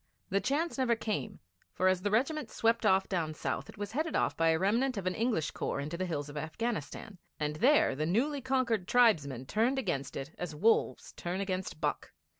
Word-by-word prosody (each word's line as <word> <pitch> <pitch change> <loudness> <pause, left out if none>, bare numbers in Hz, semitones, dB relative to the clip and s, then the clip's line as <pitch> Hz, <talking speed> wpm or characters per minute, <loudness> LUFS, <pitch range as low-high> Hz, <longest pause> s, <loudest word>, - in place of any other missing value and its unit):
The 195 +1 +2
chance 290 - -1
never 245 -3 +3
came, 215 - -4 0.3
for, 185 - +2
as 185 -1 +2
the 205 - 0
regiment 275 +8 0
swept 230 +1 +1
off 190 0 +3
down 160 -5 -2
south, - - -3
it - - -12
was 205 0 -5
headed 310 +6 -1
up - - +1
by 165 0 +3
a 160 - +3
remnant 230 +7 +1
of 195 - -4
an 185 - +1
English 220 -8 0
corps - - -3
into 150 +4 -4
the 185 +2 -2
hills 145 -4 -3
of 145 - -10
Afghanistan, 180 - -4 0.2
and 150 0 -2
there 265 - +4
the 155 +3 -1
newly 270 - +1
conquered 250 -7 0
tribesmen 150 - +3
turned 230 - +1
against 140 - -2
it 135 +3 -5
as 175 -4 -4
wolves 220 +9 +2
turn 175 +2 -4
against 190 -4 -3
buck. - - -2
195 Hz, 205 wpm, -31 LUFS, 160-240 Hz, 0.3 s, there